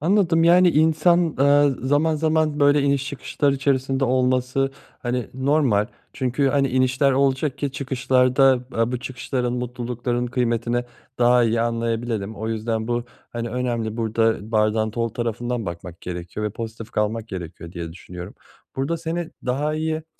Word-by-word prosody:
Anladım, 170 -1 +3
yani, 175 +1 +6
insan, 160 +2 +3
eee, 145 +1 +5
zaman 145 +4 +2
zaman 155 -1 +1
böyle 145 0 +5
iniş 140 -1 +1
çıkışlar 140 0 -1
içerisinde 135 -1 0
olması, 130 +1 +1 0.3
hani, 125 -2 -2
normal. 130 -6 +2 0.3
Çünkü, 130 +1 0
hani, 135 0 +2
inişler 130 +2 +2
olacak 135 +1 +1
ki 140 -2 -2
çıkışlar 130 -2 +1
da, 135 -2 +5
aaa, 115 +2 0
bu 125 - -2
çıkışların, 125 -1 -3
mutlulukların 125 0 -3
kıymetini 120 0 0 0.3
daha 120 0 +5
iyi 115 0 +1
anlayabilelim. 115 -2 -2
O 110 +1 -4
yüzden 110 0 -2
bu, 120 0 -1 0.3
hani, 120 0 -4
önemli, 120 -3 -2
burada 115 -1 0
bardağın 110 0 +2
dolu 115 0 -2
tarafından 120 -1 -3
bakmak 85 0 -7
gerekiyor 90 +4 -5
ve - - -2
pozitif 115 +1 -7
kalmak 110 +1 -1
gerekiyor 85 -3 -7
diye 85 -3 -6
düşünüyorum. 90 0 -9 0.4
Burada 135 +5 -1
seni 165 +1 -4 0.2
daha 145 +5 0
iyi 155 0 -1
t - - -21
125 Hz, 150 wpm, -23 LUFS, 115-140 Hz, 0.4 s, yani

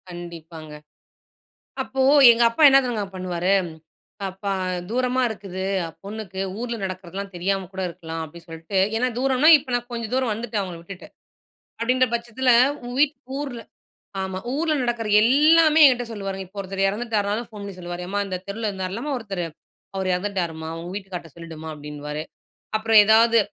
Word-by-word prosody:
கண்டிப்பாங்க. 165 -3 -9 1.1
அப்போ, 265 0 -2 0.3
எங்க 230 +1 +1
அப்பா 230 +7 -1
என்ன 270 0 +7
தெரிங்க 230 -4 -2
பண்ணுவாரு? 180 0 -1 0.8
அப்பா 195 +1 -4 0.4
தூரமா 250 +2 +1
இருக்குது, 190 -3 -6 0.4
பொண்ணுக்கு. 200 -2 -6 0.2
ஊர்ல 235 0 -3
நடக்கிறதலாம் 190 +1 -6
தெரியாம 190 +2 -1
கூட 190 0 -4
இருக்கலாம். 165 -1 -6
அப்டி 170 +2 -13
சொல்ட்டு 165 +4 -4 0.2
ஏன்னா, 250 +3 +1
தூரன்னா 265 +3 +3
இப்ப 265 -3 -8
நான் 245 0 -2
கொஞ்சம் 230 -1 -4
தூரம் 255 -3 +1
வந்துட்டேன், 220 -1 -3
அவுங்கள 180 -3 -6
விட்டுட்டு. 185 +2 -10 0.7
அப்டின்ற 255 +2 +3
பட்சத்தில, 235 +2 0 0.3
உன் 245 +1 -6
வீட் 300 0 +3 0.2
ஊர்ல 255 -5 -5 0.6
ஆமா. 190 0 -3
ஊர்ல 310 +3 0
நடக்குற 240 -3 -2
எல்லாமே 310 +6 +5
என்ட்ட 245 -1 -1
சொல்லுவாருங்க. 195 -2 -5
இப்ப 200 - -12
ஒருத்தர் 195 0 -3
இறந்துட்டாருலும் 215 +1 -1
ஃபோன் 210 -2 -9
பண்ணி 200 -1 -7
சொல்லுவாரு. 175 0 -6
எம்மா! 200 +3 -2
இந்த 185 -1 -3
தெருவுல 215 +2 -3
இருந்தாருல்லம்மா 195 +9 -4
ஒருத்தரு, 195 -6 -4 0.5
அவர் 190 -1 -2
இறந்துட்டாரும்மா! 180 -4 -2
உங்க 170 +1 -7
வீட்டுக்கார்ட்ட 190 -4 -7
சொல்லிடுமா! 165 -2 -9
அப்டின்னுவாரு. 150 0 -6 0.6
அப்புறம் 220 0 +5
ஏதாவது, 225 +2 +5
200 Hz, 145 wpm, -23 LUFS, 180-240 Hz, 1.1 s, என்ன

